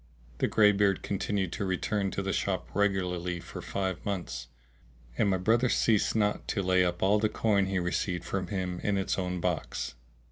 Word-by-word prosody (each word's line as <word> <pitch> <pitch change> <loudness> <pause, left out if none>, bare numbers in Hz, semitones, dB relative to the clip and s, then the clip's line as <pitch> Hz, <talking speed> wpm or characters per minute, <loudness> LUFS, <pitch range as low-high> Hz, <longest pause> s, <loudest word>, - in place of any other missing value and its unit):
The - - +2
greybeard 105 -2 +4
continued 100 -2 -1
to - - -3
return 95 +1 0
to 100 - -3
the 95 - -1
shop 95 -2 -1
regularly 90 -3 0
for - - -8
five 95 -2 -3
months, 95 -10 -4 0.7
and 100 - +2
my 95 - +2
brother 115 +7 +2
ceased 110 -2 +2
not 105 -2 +1
to 100 - -1
lay 90 0 +4
up 90 0 -1
all 100 +2 +4
the 110 0 +2
coin 105 -3 +2
he 95 0 -1
received 90 0 -1
from 95 -1 -3
him 90 -3 -3
in 100 -1 0
its 95 0 -1
own 90 -1 -2
box. - - -2
95 Hz, 180 wpm, -29 LUFS, 90-105 Hz, 0.7 s, greybeard